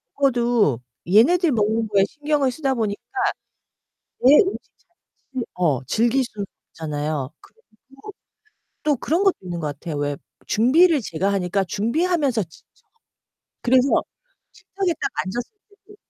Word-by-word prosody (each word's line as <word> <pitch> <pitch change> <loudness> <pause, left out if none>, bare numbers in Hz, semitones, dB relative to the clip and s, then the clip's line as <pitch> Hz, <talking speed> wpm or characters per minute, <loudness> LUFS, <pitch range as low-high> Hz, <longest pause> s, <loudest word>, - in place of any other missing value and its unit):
먹어도 240 - +2 0.3
얘네들 310 - +4
먹는 220 -1 +1
거에 200 -2 +3
신경을 295 0 0
쓰다 270 0 -1
보니까. 215 -4 -2 1.2
내 265 +3 +7
음식 385 +2 +3 0.2
자체 310 -8 -10
어 155 -8 +1
즐길 240 - +2
수는 205 -4 -6 0.3
없잖아요. 150 -3 -3
그리고 455 - -22 1.2
또 300 - +2
또 285 - +3
그런 330 +9 0
것도 390 -2 +4
있는 175 -2 -5
거 155 - -2
같아요. 150 +2 -6
왜 145 -1 -2 0.3
준비를 295 +7 +4
제가 195 0 -1
하니까 195 0 0
준비하면서 260 - 0
지쳐. 160 -2 -18 1.0
그래서 255 +2 +3 0.5
식탁에 380 -3 -3
딱 - - -1
앉았을 235 - -5 0.2
때도 410 0 -20
235 Hz, 280 characters per minute, -22 LUFS, 185-295 Hz, 1.2 s, 내